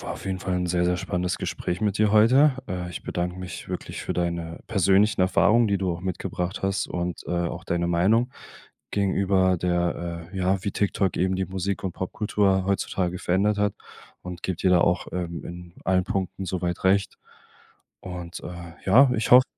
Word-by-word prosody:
war - - -5
auf - - -9
jeden 95 -1 -2
Fall 95 0 -2
'n 90 0 0
sehr, 90 0 +1
sehr 90 0 +2
spannendes 90 +1 -2
Gespräch 90 +3 -3
mit 105 -1 0
dir 105 -1 +3
heute. 130 +7 +6 0.2
Äh, 90 -1 -3
ich 85 - -7
bedanke 90 +1 -3
mich 90 -1 -7
wirklich - - -5
für - - -3
deine 85 -1 -3
persönlichen 100 0 +3
Erfahrungen, 110 +5 +4
die 100 - +2
du 95 -1 -1
auch 85 - -6
mitgebracht 90 0 -3
hast 95 -1 0
und, 90 -1 -3
äh, - - -5 0.2
auch - - -7
deine 85 0 -1
Meinung 105 +9 +3 0.6
gegenüber 95 -2 +2
der 85 -1 -2
äh, - - -7
ja, 95 0 +1
wie 100 - 0
TikTok 95 -2 0
eben 95 +1 +1
die 95 - -1
Musik 95 +1 -3
und 90 - -2
Popkultur 95 0 0
heutzutage 95 -2 -1
verändert 100 +3 +1
hat. 105 -1 +1 0.5
Und 90 -1 -8
gebe 95 -3 -1
dir 95 - +1
da 90 -2 +5
auch, 90 - +1
ähm, 85 -2 -4
in 85 0 -9
allen 90 -1 +2
Punkten 95 0 -3
so 90 0 -3
weit 85 +1 -2
recht. 95 +1 +2 0.8
Und, 90 -2 -7
äh, 85 -1 -8
ja, 125 +7 +7
ich 110 - -1
hoffe 125 +1 +9
95 Hz, 190 wpm, -25 LUFS, 90-100 Hz, 0.8 s, hoffe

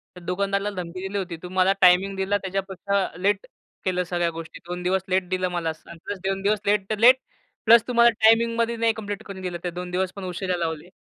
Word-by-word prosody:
तर 180 - -11
दुकानदाराला 200 +3 -1
धमकी 175 +1 -7
दिली 195 +1 -4
होती. 175 -3 -5
तू 180 +2 -9
मला 185 +1 +3
टायमिंग 185 +2 +5
दिला, 190 +1 +1
त्याच्यापेक्षा 195 0 -2
लेट 200 +2 0 0.4
केलं 180 -1 +1
सगळ्या 175 -1 -1
गोष्टी. 165 -1 -8
2 180 0 -5
दिवस 185 +1 +1
लेट 185 -1 +1
दिलं 185 0 0
मला, 170 -2 -1 0.3
प्लस 205 - -4
2 195 0 -1
दिवस 205 +2 +1
लेट 200 -1 +1
तर 215 - -1
लेट 250 +3 +8 0.5
प्लस 230 0 +7
तुम्हाला 235 -1 +5
टायमिंगमध्ये 230 +1 +4
नाही 230 0 +2
कंप्लीट 205 -1 -6
करून 195 -3 -9
दिलं. 180 -2 -4
ते 175 - -2
2 180 +1 -6
दिवस 185 0 -1
पण 200 - -7
उशिरा 180 0 -2
लावले. 165 0 -4
190 Hz, 205 wpm, -24 LUFS, 180-205 Hz, 0.5 s, लेट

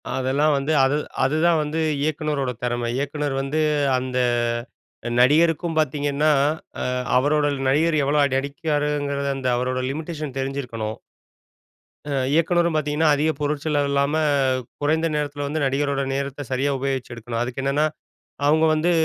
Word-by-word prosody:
அதெல்லாம் 140 +4 +2
வந்து 140 +3 -1
அது 135 +2 +3 0.3
அதுதான் 155 +4 +3
வந்து 150 +2 -3 0.2
இயக்குனரோட 150 -3 -1
தெறம. 120 -1 -1
இயக்குனர் 145 0 -2
வந்து 135 +3 -2 0.4
அந்த 125 0 -3 1.0
நடிகருக்கும் 165 +5 +3
பாத்தீங்கன்னா, 145 0 +1 0.5
ஆ - - -1 0.3
அவரோட 145 +3 +2 0.2
நடிகர் 155 +4 +2
எவ்ளோ 145 +2 +1
அடி 135 -2 +1
அடிக்கிறாருங்கிறது 145 -1 -2
அந்த 130 -1 -3
அவரோட 130 +1 -1
லிமிட்டேஷன் 155 -2 -5
தெரிஞ்சிருக்கணும். 125 -5 -3 1.2
ஆ - - 0 0.2
இயக்குனரும் 170 +1 +2
பாத்தீங்கன்னா, 155 +1 +1
அதிக 155 +2 +1
பொருட்செலவில்லாம 145 -1 0 0.7
குறைந்த 160 +3 +2
நேரத்தில 145 -1 -2
வந்து 155 +2 -2
நடிகரோட 140 +1 0
நேரத்த 140 0 -3
சரியா 135 +2 +1
உபயோகிச்சு 135 -2 -3
எடுக்கணும். 115 0 -4
அதுக்கு 125 +2 -3
என்னன்னா, 140 +3 +2 0.6
அவுங்க 155 +2 +4
வந்து 160 +3 +1
145 Hz, 125 wpm, -23 LUFS, 135-155 Hz, 1.2 s, அவுங்க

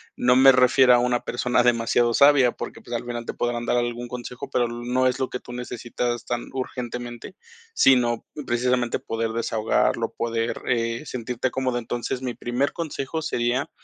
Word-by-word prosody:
No 125 +1 +3
me 135 0 +8
refiero 125 0 +5
a 120 - +4
una 125 0 +1
persona 125 +1 +1
demasiado 120 0 +2
sabia, 140 -2 +5
porque, - - -7
pues, 120 - -7
al 115 - -3
final 120 -1 -5
te - - -4
podrán 120 0 -2
dar - - +1
algún 120 0 -2
consejo, 125 +2 -7
pero 120 -3 +1
no 120 +2 0
es 125 - -1
lo 130 - -1
que 125 - -5
tú - - -11
necesitas 120 -1 -4
tan 120 -1 -3
urgentemente, 120 -2 -6 0.4
sino 120 - +3 0.2
precisamente 120 0 +1
poder 115 0 -3
desahogarlo, 110 -1 0
poder, 115 0 -2
eh, 115 +1 0
sentirte 125 0 -3
cómodo. 130 -1 -1
Entonces, 120 +2 -4
mi 125 -2 -3
primer 120 +4 -1
consejo 160 -2 -4
sería, 130 0 -1
120 Hz, 170 wpm, -24 LUFS, 120-125 Hz, 0.4 s, me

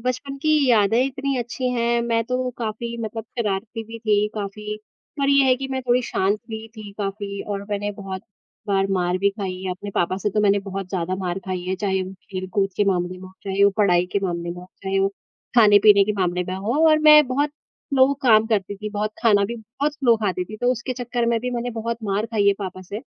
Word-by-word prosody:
बचपन 255 +2 -2
की 310 - +2 0.2
यादें 225 +1 +4
इतनी 275 0 -2
अच्छी 245 +2 -2
हैं। 235 0 +1
मैं 230 -1 +1
तो 250 +1 -1
काफ़ी 235 +1 -4
मतलब 220 0 -5
शरारती 215 +1 -2
भी 225 +1 -9
थी 210 -2 +2
काफ़ी 210 0 -5 0.4
पर 275 -1 +1
ये 280 -1 +5
है 260 -1 +5
कि 270 +1 -5
मैं 265 0 -1
थोड़ी 250 0 +2
शांत 205 -2 0
हुई 220 0 -5
थी 215 -2 -8
काफ़ी 200 0 -4
और 200 -1 -4
मैंने 205 0 -1
बहुत 195 -2 -7 0.5
बार 195 -1 +2
मार 180 -1 +1
भी 200 +1 +2
खाई 195 -3 -5
है। 185 - -2
अपने 195 +3 -6
पापा 175 +2 +1
से 200 +2 -1
तो 210 - +1
मैंने 205 -1 +4
बहुत 195 -1 -5
ज़्यादा 185 -1 -2
मार 185 -1 -3
खाई 185 -1 -3
है, 185 +1 -1
चाहे 190 -1 0
वो 185 +1 -7 0.2
खेल-कूद 185 +1 -1
के 205 - +3
मामले 180 -2 0
में - - -15
हो, 185 - -14
चाहे 195 0 0
वो 200 - +6
पढ़ाई 180 -4 +3
के - - +2
मामले 170 -2 -2
में 175 - -6
हो, 180 - -12 0.2
चाहे 195 0 0
वो 195 - +3 0.5
खाने-पीने 205 -2 +7
के 210 - 0
मामले 180 -1 +1
में 185 - -2
हो 230 +12 0
और 310 0 +5
मैं 300 -1 +7
बहुत 285 +4 0
स्लो 275 -2 0
काम 220 -3 +5
करती 205 -3 -1
थी 210 +1 -5
बहुत, 210 +1 -2
खाना 205 -3 +5
भी 235 +4 -4
बहुत 250 +7 -3
स्लो 250 -6 +3
खाती 185 -2 0
थी 215 +4 -9
तो 245 - +3
उसके 255 +1 -4
चक्कर 245 -1 -2
में 235 0 +2
भी 250 +2 -3
मैंने 245 0 -2
बहुत 230 0 -3
मार 205 +2 0
खाई 220 -3 0
है 200 - +6
पापा 185 -2 -5
से। 200 +3 -6
210 Hz, 230 wpm, -22 LUFS, 195-235 Hz, 0.5 s, खाने-पीने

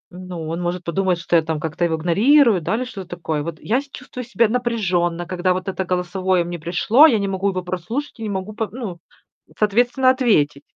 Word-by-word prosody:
Ну, 180 -3 -7
он 165 +2 -3
может 175 +1 -2
подумать, 185 +1 0
что 170 +1 -1
я 165 - +6
там 160 -1 -3
как-то 160 +2 -2
его 165 -1 0
игнорирую, 210 - +4
да, 190 - -1
или 245 - -1
что-то 195 -8 -8
такое. 160 -3 -3
Вот 160 +1 -5
я 245 +5 0
с 280 - -17
чувствую 255 -1 -8
себя 235 -1 +2
напряжённо, 190 -8 0
когда 180 +1 0
вот 185 +1 -5
это 190 0 -2
голосовое 180 0 0
мне 175 0 -6
пришло, 195 - +5
я 235 - +3
не 200 - -1
могу 195 +1 0
его 185 -1 -3
прослушать 185 - -4
и - - -6
не 215 - -3
могу 195 +1 -4
по 220 0 -3
ну, 215 -8 -6 0.6
соответственно, 245 +5 +3
ответить. 180 - +2
185 Hz, 210 wpm, -21 LUFS, 175-230 Hz, 0.6 s, я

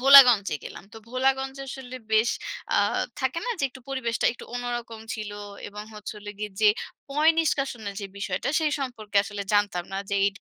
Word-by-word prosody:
ভোলাগঞ্জে 250 - +9
গেলাম। - - -8
তো - - -10
ভোলাগঞ্জে 265 +1 0
আসলে 255 -1 -6 0.2
বেশ 220 +1 +5 0.5
আ - - +5 0.4
থাকে 265 +5 0
না - - 0
যে, 275 - +1
একটু 260 0 -13
পরিবেশটা 235 -4 0
একটু 240 - -11
অন্যরকম 240 -2 -3
ছিল 215 -2 -5 0.4
এবং 210 +1 -7
হচ্ছে 210 +1 -6
হল 205 - -14
গিয়ে 210 0 -3
যে, 210 - +7 0.4
পয় 305 +3 +5
নিষ্কাশনের 265 -10 0
যে, 200 - -4
বিষয়টা 190 +2 -2
সেই 305 -1 +2
সম্পর্কে 220 -6 -4
আসলে 205 0 -4
জানতাম 205 -4 +2
না - - -2
যে, - - +1
এই 200 - +4
240 Hz, 180 wpm, -26 LUFS, 210-265 Hz, 0.5 s, ভোলাগঞ্জে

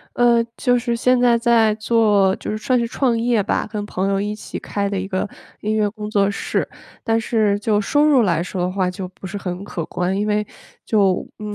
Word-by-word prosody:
呃， 240 -1 +4
就 245 -2 +2
是 235 -1 -1
现 250 +2 +2
在 240 -1 +4
在 230 -2 +3
做 215 -3 +3
就 - - -6
是 215 - -2
算 250 +3 +1
是 235 - -1
创 240 -2 0
业 230 -3 +1
吧， 215 - -1
跟 205 -1 -4
朋 195 -1 -2
友 195 0 +1
一 210 +1 -2
起 210 - -7
开 200 -1 -2
的 200 - -2
一 190 - -2
个 185 +1 -1 0.3
音 215 +1 -1
乐 210 -1 +2
工 210 0 -7
作 200 -1 +2
室。 - - -2 0.4
但 225 -1 +1
是 215 -3 +1
就 210 0 +1
收 290 +8 +2
入 280 -5 +5
来 170 -6 +1
说 180 +1 -4
的 180 - -1
话， 185 -1 0
就 180 0 -6
不 190 0 -10
是 205 +1 -5
很 180 -1 -5
可 170 -4 -4
观。 180 +2 -1
因 205 - 0
为 210 0 0 0.4
就， 195 -4 +2
嗯， 210 -1 -5
210 Hz, 245 characters per minute, -20 LUFS, 195-230 Hz, 0.4 s, 入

